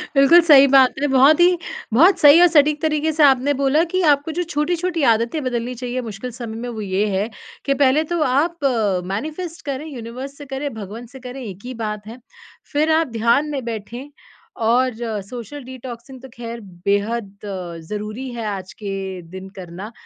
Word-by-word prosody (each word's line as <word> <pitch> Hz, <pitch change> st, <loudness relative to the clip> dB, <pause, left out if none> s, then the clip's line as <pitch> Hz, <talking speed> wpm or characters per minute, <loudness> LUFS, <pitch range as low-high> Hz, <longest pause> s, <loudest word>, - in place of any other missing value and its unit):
बिल्कुल 275 Hz, +6 st, +7 dB
सही 280 Hz, -4 st, +7 dB
बात 265 Hz, -1 st, +5 dB
है, 290 Hz, -, +2 dB
बहुत 270 Hz, +4 st, +5 dB
ही 355 Hz, 0 st, +5 dB, 0.4 s
बहुत 345 Hz, -, +5 dB
सही 295 Hz, +4 st, +8 dB
और 355 Hz, -, +8 dB
सटीक 300 Hz, -2 st, +3 dB
तरीके 315 Hz, 0 st, +1 dB
से 305 Hz, 0 st, +3 dB
आपने 275 Hz, +1 st, +4 dB
बोला 285 Hz, +4 st, +3 dB
कि 370 Hz, -, +2 dB
आपको 285 Hz, +3 st, 0 dB
जो 355 Hz, -, +1 dB
छोटी-छोटी 335 Hz, +1 st, -1 dB
आदतें 235 Hz, +8 st, -2 dB
बदलनी 245 Hz, 0 st, -3 dB
चाहिए 250 Hz, +1 st, -4 dB
मुश्किल 230 Hz, +2 st, -7 dB
समय 230 Hz, -2 st, -7 dB
में, 245 Hz, +1 st, -5 dB
वो 220 Hz, -2 st, -6 dB
ये 195 Hz, +1 st, 0 dB
है 210 Hz, +4 st, -1 dB, 0.4 s
कि 275 Hz, -, +2 dB
पहले 280 Hz, +2 st, +3 dB
तो 335 Hz, -, 0 dB
आप 300 Hz, +5 st, 0 dB
अ, 210 Hz, -8 st, +1 dB
मैनिफ़ेस्ट 315 Hz, -, -5 dB
करें, 280 Hz, +2 st, -4 dB
यूनिवर्स 255 Hz, +1 st, -8 dB
से 290 Hz, -, -10 dB
करें, 270 Hz, 0 st, -4 dB
भगवन 220 Hz, +3 st, -8 dB
से 265 Hz, -, -10 dB
करें, 255 Hz, +1 st, -8 dB
एक 200 Hz, +1 st, -9 dB
ही 255 Hz, -, -5 dB
बात 210 Hz, 0 st, -5 dB
है। 230 Hz, +3 st, -9 dB, 0.6 s
फिर 305 Hz, +2 st, +2 dB
आप 320 Hz, -1 st, +3 dB
ध्यान 235 Hz, +7 st, +2 dB
में 270 Hz, -3 st, -3 dB
बैठे 235 Hz, +5 st, -6 dB, 0.5 s
और 245 Hz, +2 st, +2 dB, 0.3 s
सोशल 250 Hz, +6 st, -8 dB
डिटॉक्सिंग 255 Hz, 0 st, -9 dB
तो 265 Hz, -, -11 dB
खैर 235 Hz, 0 st, -7 dB, 0.3 s
बेहद 205 Hz, +3 st, 0 dB, 0.2 s
अ, 180 Hz, -4 st, -6 dB
ज़रूरी 215 Hz, +5 st, -5 dB
है 230 Hz, -2 st, -5 dB
आज 190 Hz, -2 st, -5 dB
के 195 Hz, -2 st, -4 dB
दिन 190 Hz, 0 st, -8 dB
करना, 185 Hz, +4 st, -8 dB
255 Hz, 185 wpm, -20 LUFS, 220-290 Hz, 0.6 s, सही